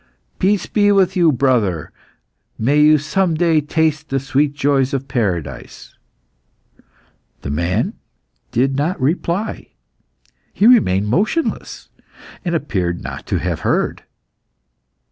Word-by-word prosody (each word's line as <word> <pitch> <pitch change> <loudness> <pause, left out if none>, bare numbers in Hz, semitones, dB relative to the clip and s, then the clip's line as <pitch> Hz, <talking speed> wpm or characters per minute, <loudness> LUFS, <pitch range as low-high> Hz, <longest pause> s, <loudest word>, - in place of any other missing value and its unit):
"Peace 200 +1 +1
be 205 -1 +2
with 190 -2 +3
you, 170 -3 +4
brother! 120 - 0 0.7
May 140 +7 +2
you 155 +1 +6
some 165 +4 0
day 165 -1 +2
taste 155 0 -1
the 135 - 0
sweet 140 +2 0
joys 140 -1 +1
of 135 0 -4
paradise." 90 - -4 1.5
The 70 - -5
man 85 +5 -1 0.6
did 135 +3 +1
not 155 +6 -1
reply. 170 +8 -2 0.8
He 205 - +1
remained 105 - +4
motionless, 210 - -2 0.5
and 170 -3 -1
appeared 90 - -2
not - - -7
to - - 0
have - - -2
heard. - - -1
145 Hz, 115 wpm, -18 LUFS, 125-170 Hz, 1.5 s, you